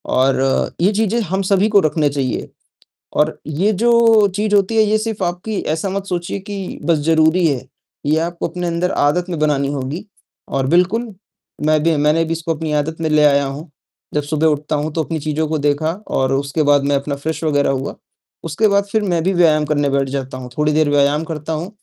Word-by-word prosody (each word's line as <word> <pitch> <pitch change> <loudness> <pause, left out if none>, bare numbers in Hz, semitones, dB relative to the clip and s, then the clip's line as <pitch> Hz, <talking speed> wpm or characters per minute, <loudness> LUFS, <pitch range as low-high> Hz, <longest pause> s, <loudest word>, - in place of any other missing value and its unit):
और 135 +1 +1
ये 190 - +4
चीज़ें 220 +2 +1
हम 190 -1 -2
सभी 195 +2 +2
को 205 -2 +5
रखने 155 -1 +1
चाहिए। 135 -3 -3 0.7
और 150 +1 +1
ये 170 +8 0
जो 225 -1 +4
चीज़ 210 0 0
होती 200 +3 +2
है 220 - +6
ये 215 +1 +2
सिर्फ़ 215 -2 -4
आपकी 180 +4 -3 0.2
ऐसा 165 +5 -3
मत 195 0 -3
सोचिए 175 +1 -3
कि 200 -1 -6
बस 165 -1 +2
ज़रूरी 160 +2 +3
है, 130 -4 -1 0.4
ये 155 +2 +2
आपको 170 0 -3
अपने 175 +1 -4
अंदर 175 +2 -1
आदत 175 +6 +1
में 170 - -3
बनानी 145 -2 +1
होगी 140 +6 -4 0.4
और 135 -1 -1
बिल्कुल, 190 - +1 0.5
मैं 155 -1 +3
भी 165 -1 +2
मैंने 150 +3 +2
भी 165 - -3
इसको 165 0 -2
अपनी 155 0 -4
आदत 150 +2 -1
में 160 - 0
ले 155 0 +4
आया 140 -1 +4
हूँ। 145 +4 -7 0.4
जब 150 - +1
सुबह 155 +2 0
उठता 150 0 0
हूँ, 150 +1 -2
तो 160 - 0
अपनी 165 -1 -3
चीज़ों 155 +1 -2
को 155 - -1
देखा 145 +2 0 0.2
और 130 0 0
उसके 140 +3 -1
बाद 145 -1 +3
मैं 145 0 +2
अपना 140 +1 -2
फ्रेश 160 +4 -4
वग़ैरह 145 -3 +2
हुआ, 135 +1 -3 0.5
उसके 165 +7 +1
बाद 200 0 +2
फिर 220 - +2
मैं 175 -5 0
भी 190 - +2
व्यायाम 155 -3 +4
करने 145 -2 0
बैठ 135 0 0
जाता 130 -1 -4
हूँ, 125 -1 -9
थोड़ी 150 0 +2
देर 155 -1 +2
व्यायाम 145 +2 +2
करता 160 -1 -5
हूँ। 160 +4 -3
160 Hz, 210 wpm, -18 LUFS, 145-180 Hz, 0.7 s, है